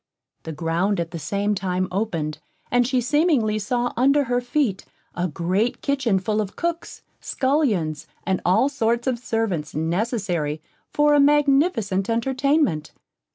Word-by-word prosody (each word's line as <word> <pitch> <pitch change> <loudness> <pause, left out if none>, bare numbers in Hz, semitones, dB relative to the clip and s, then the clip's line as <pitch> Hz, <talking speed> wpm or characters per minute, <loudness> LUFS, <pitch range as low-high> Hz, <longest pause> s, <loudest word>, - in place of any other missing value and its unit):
The 160 - -4
ground 170 +6 -1
at 170 -1 -3
the 170 - -5
same 205 +4 -1
time 185 -1 -1
opened, 170 -7 -2 0.3
and 245 -1 +3
she 260 -1 +1
seemingly 255 -6 +2
saw 240 +4 -1
under 275 +4 +3
her 245 -1 0
feet, 245 -5 -1 0.3
a 180 +1 -1
great 185 +8 -1
kitchen 265 -8 +1
full 210 +3 0
of 200 -2 -6
cooks, 340 0 -4 0.2
scullions, 225 - 0 0.2
and 190 -2 0
all 195 +9 +3
sorts 235 -4 0
of 255 -3 0
servants 220 -10 -2
necessary 170 - -1 0.3
for 295 0 +3
a 290 - +5
magnificent 275 - +2
entertainment. 260 - 0
220 Hz, 140 wpm, -23 LUFS, 180-265 Hz, 0.3 s, a